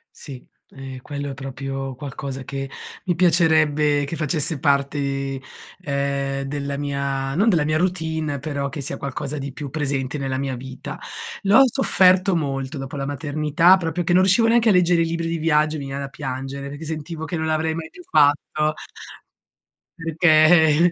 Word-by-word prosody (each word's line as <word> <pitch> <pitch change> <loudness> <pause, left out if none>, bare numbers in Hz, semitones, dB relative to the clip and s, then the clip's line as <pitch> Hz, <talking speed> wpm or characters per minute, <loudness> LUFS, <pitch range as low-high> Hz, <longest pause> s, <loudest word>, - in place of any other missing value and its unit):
Sì, 135 -5 -11 0.2
ehm, 135 -1 -8
quello 145 0 -5
è 135 - -5
proprio 135 0 -5
qualcosa 135 0 -6
che 135 +1 -5 0.3
mi 180 - +1
piacerebbe 155 -4 +3
che 145 +4 -5
facesse 155 0 -1
parte, 140 -1 0 0.4
ehm, 140 -3 -2
della 140 0 -3
mia 140 -1 -2
non 205 +7 +3
della 165 -6 +2
mia 155 +1 +1
routine, 160 -4 -1
però 140 -1 -3
che 150 - -6
sia 135 - -4
qualcosa 140 +2 -4
di 140 0 -5
più 145 +1 -6
presente 140 -2 -2
nella 135 -1 -2
mia 135 -2 -2
vita. 130 +1 -8 0.4
L'ho 205 +7 +6
sofferto 190 -7 +3
molto 135 -2 -2
dopo 135 +1 -6
la 135 - -3
maternità, 155 +4 +3
proprio 175 -1 -2
che 175 - +1
non 185 - +6
riuscivo 195 +5 +4
neanche 230 -1 +4
a - - +6
leggere 175 -2 +4
i 165 - 0
libri 165 0 -2
di 165 0 -2
viaggio, 155 -1 +2
mi 140 - -5
veniva 135 +1 -4
da 140 - -4
piangere 135 0 -5
perché 145 +3 -8
sentivo 160 +1 -5
che 175 - -4
non 160 0 -2
l'avrei 160 0 0
mai 160 0 -6
più 360 - -13
fatto 150 +1 +3 1.3
perché, 160 0 +5
150 Hz, 170 wpm, -22 LUFS, 140-165 Hz, 1.3 s, L'ho